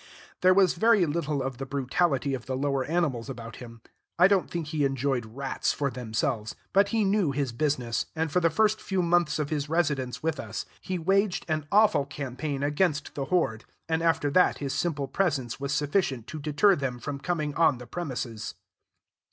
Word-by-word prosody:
There 185 0 +6
was 190 -2 +5
very 215 0 +4
little 150 -3 -1
of 130 -1 -4
the 135 - -3
brutality 140 +1 0
of 125 -3 -5
the 130 -1 -2
lower 140 -1 0
animals 145 -7 -1
about 115 -3 -7
him; 115 -2 -11 0.4
I 180 +2 +7
don't 195 -2 +2
think 170 -2 -3
he 155 -2 0
enjoyed 135 -3 0
rats 135 +4 -2
for 140 -2 -1
themselves, 110 -2 -2 0.2
but 200 +1 +5
he 220 +1 +1
knew 195 -4 +2
his 140 -2 -1
business, 125 -2 -1
and 160 -1 -1
for 180 - +3
the 165 -1 +3
first 215 +6 +2
few 190 -2 -1
months 175 -2 +2
of 150 -1 -2
his 145 -1 -2
residence 145 -7 0
with 160 -2 -1
us 110 -1 -5 0.2
he 185 - -3
waged 195 +3 +1
an 155 -2 -2
awful 200 -9 +4
campaign 140 0 -4
against 150 +1 0
the 140 - -3
horde, 135 -10 0 0.2
and 160 0 0
after 165 -3 +2
that 180 +4 +4
his 140 -2 -3
simple 145 -2 -1
presence 135 -7 -1
was 140 0 -3
sufficient 145 - 0
to 155 - -7
deter 155 +7 +3
them 135 -5 -3
from 140 +3 -5
coming 155 -2 -2
on 160 -5 +3
the 125 - -10
premises. 125 -9 -5
145 Hz, 190 wpm, -27 LUFS, 130-175 Hz, 0.4 s, I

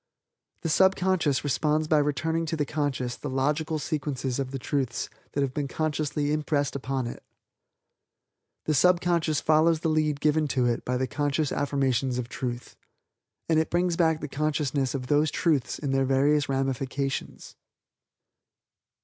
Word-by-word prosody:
The 165 - -1
subconscious 185 -4 +2
responds 150 +2 +1
by 155 -1 +4
returning 160 +3 0
to 160 - -1
the 150 - 0
conscious 135 -5 -2
the 145 - -6
logical 150 +4 0
sequences 140 -4 -2
of 135 -2 -2
the 135 - -4
Truths 130 -2 -2 0.2
that 140 - 0
have 135 -2 -1
been 145 -1 -2
consciously 150 -1 -1
impressed 145 -2 0
upon 135 -1 -2
it. 120 - -6 1.4
The 155 - +1
subconscious 170 -2 +2
follows 160 +1 +3
the 165 - 0
lead 155 -2 +1
given 155 +1 +2
to 125 - +3
it 120 -1 0
by 125 0 -1
the 130 - 0
conscious 145 +3 -1
affirmations 135 -3 0
of 120 -1 -4
Truth, 120 -1 -5 0.7
and 160 -1 +3
it 160 - 0
brings 175 0 +1
back 160 -2 +2
the 150 - -4
consciousness 145 -2 -1
of 130 -2 -3
those 150 +3 +2
Truths 150 -6 0
in 140 -3 -3
their 135 0 +2
various 140 +2 +2
ramifications." 135 0 -2
145 Hz, 150 wpm, -27 LUFS, 135-155 Hz, 1.4 s, by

